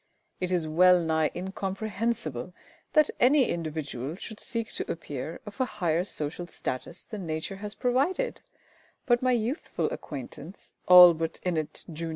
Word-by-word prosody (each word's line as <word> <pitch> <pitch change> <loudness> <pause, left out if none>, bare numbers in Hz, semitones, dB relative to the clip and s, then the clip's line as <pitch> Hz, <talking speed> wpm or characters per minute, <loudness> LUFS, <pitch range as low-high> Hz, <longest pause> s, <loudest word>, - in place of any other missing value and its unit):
It 185 0 -2
is 175 -3 +1
well 180 +3 +6
nigh 160 -2 +1
incomprehensible 190 - -3 0.4
that 305 -1 +5
any 265 +1 +5
individual 155 -4 -4
should 220 +3 -8
seek 230 -1 -3
to - - -3
appear 155 -1 -6
of 210 +5 -6
a - - +3
higher 170 -2 +1
social 165 0 -4
status 130 -6 -5
than 200 -5 -7
Nature 160 +5 -3
has 205 +1 -6
provided; 280 - 0 0.6
but 240 -2 +3
my 255 0 +3
youthful 240 +6 -1
acquaintance, 145 +5 -8
ALLBUTT 175 -3 +8
INNETT, 160 -4 -2
Jun. 165 +1 -4
180 Hz, 140 wpm, -28 LUFS, 160-220 Hz, 0.6 s, ALLBUTT